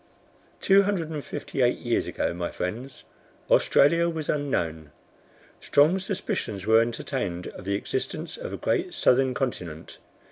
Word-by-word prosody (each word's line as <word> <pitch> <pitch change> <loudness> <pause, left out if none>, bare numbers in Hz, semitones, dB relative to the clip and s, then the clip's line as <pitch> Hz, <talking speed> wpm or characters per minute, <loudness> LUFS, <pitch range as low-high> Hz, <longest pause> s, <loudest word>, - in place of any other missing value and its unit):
Two 195 0 +6
hundred 190 -5 -1
and 150 -3 -4
fifty 135 - -4
eight 125 0 +3
years 120 -1 -1
ago, - - -2
my 85 0 -3
friends, 120 +9 -5 0.5
Australia 170 +4 +4
was 160 -2 -5
unknown. 85 - -1 0.7
Strong 155 +7 +3
suspicions 145 - -3
were 110 +1 +6
entertained 115 -6 -3
of - - -11
the 100 +1 0
existence 100 - -3
of - - -7
a - - -4
great - - -1
southern 130 0 +3
continent. 90 - -4
125 Hz, 140 wpm, -26 LUFS, 95-155 Hz, 0.7 s, Two